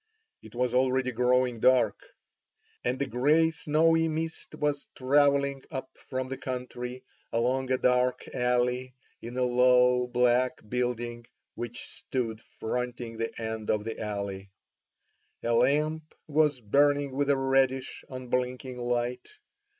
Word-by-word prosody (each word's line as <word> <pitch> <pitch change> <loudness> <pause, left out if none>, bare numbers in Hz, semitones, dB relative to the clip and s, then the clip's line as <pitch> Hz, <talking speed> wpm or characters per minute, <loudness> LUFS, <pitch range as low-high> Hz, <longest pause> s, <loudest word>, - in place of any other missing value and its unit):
It - - -14
was 125 0 0
already 130 0 +2
growing 125 0 +2
dark, 120 -4 +3 0.8
and 125 +2 -1
a 140 - +1
grey 150 +6 +3
snowy 165 +1 +2
mist 160 +1 -4
was 145 -1 -1
travelling 140 0 +3
up 130 -3 -6
from 130 0 -5
the 135 0 -6
country, 125 -1 -5 0.3
along 130 +3 0
a 130 - +3
dark 125 0 +1
alley; 125 +1 0 0.3
in 120 +2 -7
a 130 - +2
low 125 0 +4
black 125 -1 +1
building, 120 0 -2 0.3
which 120 0 -6
stood 115 -4 -4
fronting 120 0 -4
the 115 0 -4
end 110 -1 -4
of 105 -1 +1
the 115 0 -5
alley, 100 -2 -4 0.9
a 115 - +1
lamp 150 +6 +1
was 150 -2 +2
burning 145 +5 +3
with 140 +2 -1
a 140 - +4
reddish, 135 0 +1
unblinking 125 0 -3
light. 120 0 -2
125 Hz, 125 wpm, -28 LUFS, 120-135 Hz, 0.9 s, low